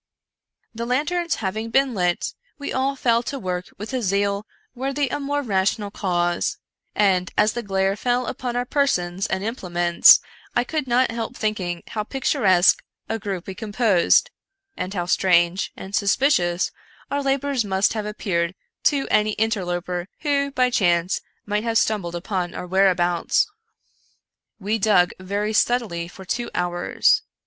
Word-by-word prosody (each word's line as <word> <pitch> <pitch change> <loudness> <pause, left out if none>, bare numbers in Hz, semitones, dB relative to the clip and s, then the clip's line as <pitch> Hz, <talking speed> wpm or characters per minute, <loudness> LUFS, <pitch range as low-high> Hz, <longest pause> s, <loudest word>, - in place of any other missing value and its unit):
The 235 +1 -4
lanterns 335 +7 0
having 215 +3 -3
been 270 +2 +2
lit, 180 -4 0 0.2
we 285 - -5
all 270 +1 0
fell 235 -3 +2
to 275 +3 -5
work 180 -5 -3
with 210 +6 -7
a 255 - 0
zeal 200 0 0 0.3
worthy 270 +3 -1
a 290 - -2
more 285 +1 -1
rational 200 -1 0
cause; 175 -3 0 0.4
and, 190 -3 +2
as 215 - +4
the 240 - -3
glare 195 -2 0
fell 245 +3 0
upon 245 +1 -4
our 245 0 0
persons 195 -10 0
and 190 0 -2
implements, 175 -6 +5 0.4
I 240 - +3
could 300 +1 -3
not 245 +1 +2
help 230 +1 -4
think 215 -1 -1
ing 175 -2 -4
how 215 - -3
picturesque 195 -7 +3 0.2
a 225 - -2
group 195 -4 -4
we 190 - -6
composed, 215 - +2 0.4
and 185 +1 -4
how 180 -3 -2
strange 175 0 +2
and 190 - -9
suspicious 200 -5 +2 0.4
our 285 0 0
labors 275 -2 0
must 195 -1 +1
have 215 -2 -3
appeared 180 -4 -2 0.3
to 280 -2 +2
any 215 0 +2
inter 220 -3 0
loper 175 0 -3
who, 285 -2 +1
by 255 -2 +1
chance, 175 -3 +2 0.2
might 210 +1 -1
have 230 -1 +1
stumbled 195 -7 0
upon 180 0 -3
our - - -5
whereabouts. 180 -2 +2 1.1
We 215 +2 -1
dug 195 -4 +4
very 200 +3 -2
steadily 210 -8 +1
for 190 +2 -12
two 240 +5 -2
hours. 175 0 +2
210 Hz, 155 wpm, -23 LUFS, 180-245 Hz, 1.1 s, implements